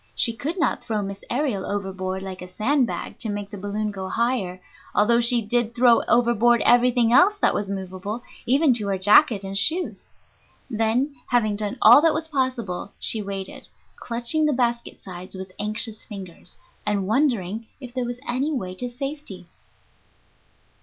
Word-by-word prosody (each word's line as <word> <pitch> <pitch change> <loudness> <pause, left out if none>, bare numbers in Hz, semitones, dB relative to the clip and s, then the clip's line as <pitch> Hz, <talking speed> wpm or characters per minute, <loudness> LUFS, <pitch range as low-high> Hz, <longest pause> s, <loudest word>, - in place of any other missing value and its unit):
She 230 - +4
could 310 +10 -4
not 320 - 0
throw 215 -4 -2
Miss 200 0 -7
Aërial 250 -7 -1
overboard 190 -1 -4
like 190 -1 -7
a 180 - -7
sand 250 +8 +1
bag - - -6
to 225 - -3
make 205 -1 -5
the 205 - -7
balloon 210 +2 -3
go 190 -2 -6
higher, 225 -7 -1 0.4
although 235 +3 +4
she 235 0 +1
did 235 +2 -1
throw 240 -1 +5
overboard 240 0 +3
everything 240 -1 +4
else 380 +9 +6
that - - +2
was 200 -1 -3
movable, 195 +4 -5 0.2
even 275 +2 +4
to 215 -4 +1
her 195 -1 0
jacket 205 +2 +5
and 195 0 -6
shoes. 320 - +1 0.6
Then, 230 +6 0
having 220 -4 +1
done 205 -1 -3
all 235 +6 +9
that 320 -1 +3
was 320 +1 -3
possible, 255 - -2
she 220 - -1
waited, 195 -1 -6 0.3
clutching 240 +7 0
the 300 - +1
basket 235 -2 -2
sides 185 0 -8
with 190 0 -8
anxious 215 +1 -2
fingers, 190 -4 -9 0.3
and 205 -2 -1
wondering 220 -3 0
if 250 -3 -10
there 255 -1 -2
was 240 0 -5
any 265 +5 -1
way 190 -11 -3
to 245 +7 -4
safety. 270 -7 -7
225 Hz, 165 wpm, -23 LUFS, 200-250 Hz, 0.6 s, all